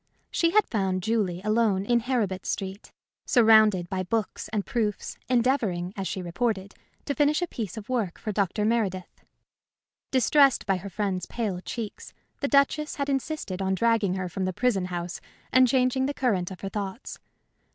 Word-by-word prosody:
She 335 - +2
had 425 +5 +4
found 190 -5 -1
Julie 200 -5 0
alone 215 -3 +2
in 240 +2 +3
Heribert 220 -6 -1
Street, 195 +2 -4 0.3
surrounded 220 -6 +5
by 185 +1 -2
books 210 +3 -2
and 210 -2 -2
proofs, 215 -4 -2
endeavoring, 230 -8 +1
as 195 -2 -3
she 190 - -4
reported, 195 +2 -2 0.3
to 285 - -1
finish 295 +1 +2
a - - -1
piece 225 - -5
of 215 0 -7
work 230 -9 -1
for 215 - -4
Dr. 205 +1 0
Meredith. 205 -5 -1 0.9
Distressed 270 +1 +4
by 195 -1 +1
her 195 +2 -7
friend's 190 -2 -2
pale 210 -7 -3
cheeks, 220 +1 -7 0.2
the 280 - 0
Duchess 285 +2 +2
had 280 -1 -2
insisted 270 -8 -2
on 190 0 +1
dragging 220 -3 +2
her 185 -1 -2
from 185 +2 -3
the 185 - -2
prison 210 -4 +1
house 175 -1 -5 0.3
and 255 0 +6
changing 260 +1 +2
the 285 - -3
current 195 -9 0
of 190 - -10
her 195 - -4
thoughts. 200 +3 -5
215 Hz, 170 wpm, -26 LUFS, 190-250 Hz, 0.9 s, and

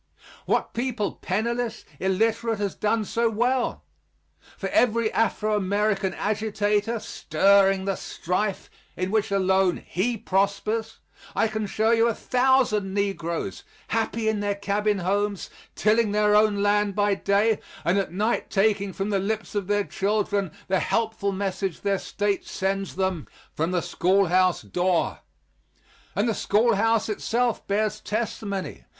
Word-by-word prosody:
What - - 0
people, 235 -4 -1
penniless, 235 +4 -2
illiterate, 225 +4 +1
has 200 -2 -2
done 215 +1 0
so 230 +3 +1
well? 245 +3 0 0.7
For - - -3
every 230 -2 +2
Afro 215 -1 +1
American 200 -1 0
agitator, 210 +1 0
stirring 195 +2 +3
the 195 -1 0
strife 185 +4 -3 0.3
in 185 +1 -2
which 220 0 +1
alone 190 -2 +2
he 225 +6 -1
prospers, 210 +3 -1 0.4
I - - +3
can 215 -1 -3
show 220 +3 +1
you 230 0 +4
a 230 - 0
thousand 250 -6 +2
negroes, 195 -3 -2 0.3
happy 225 0 -1
in 220 -1 +1
their 205 0 -1
cabin 205 +1 0
homes, 200 +2 -1 0.2
tilling 215 0 +2
their 210 0 +3
own 210 -1 +3
land 205 -1 +2
by 205 -1 +2
day, 200 +3 +2 0.3
and 180 +4 +3
at 195 - -2
night 210 +6 -1
taking 200 -1 +1
from 195 +3 -3
the 200 - +2
lips 215 +3 -3
of 205 -3 -2
their 205 0 +2
children 200 -1 -1 0.2
the 190 0 +2
helpful 220 -3 0
message 195 -2 -3
their 200 -1 0
State 205 -1 -1
sends 195 0 -2
them 190 -4 -1 0.3
from 160 +2 -1
the 180 -1 0
schoolhouse 185 0 +2
door. 180 -1 0 1.0
And 205 +4 +1
the 225 - +1
schoolhouse 225 +1 +2
itself 230 +2 -1
bears 215 +1 0
testimony. 200 - -4
205 Hz, 135 wpm, -25 LUFS, 195-220 Hz, 1.0 s, you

